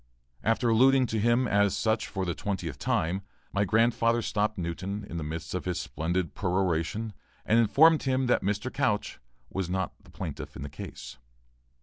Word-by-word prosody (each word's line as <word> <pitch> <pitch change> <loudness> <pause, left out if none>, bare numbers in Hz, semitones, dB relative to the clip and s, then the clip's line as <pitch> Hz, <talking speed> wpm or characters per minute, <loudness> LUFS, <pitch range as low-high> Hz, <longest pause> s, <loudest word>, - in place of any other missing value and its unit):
After 115 +2 +2
alluding 130 +3 +5
to 110 -2 -1
him 120 +3 +3
as 100 -2 +2
such 110 0 +1
for 95 -2 -3
the 85 - -1
twentieth 90 -7 -4
time, 90 +4 0 0.3
my 100 +1 +2
grandfather 115 +2 +3
stopped 105 +1 0
Newton 95 +4 -4
in 85 - -6
the 80 - -3
midst 80 +2 -5
of 90 - -3
his 90 -1 -1
splendid 85 +1 -2
peroration 95 +3 -1 0.3
and 115 - +4
informed 155 +8 +6
him 130 -1 +1
that 125 - +3
Mr. 105 +6 -2
Couch 110 -7 0 0.3
was 95 -2 -2
not 95 -1 -1
the - - -19
plaintiff - - -6
in 65 - -6
the 70 - -5
case. 70 - -9
100 Hz, 175 wpm, -28 LUFS, 90-115 Hz, 0.3 s, informed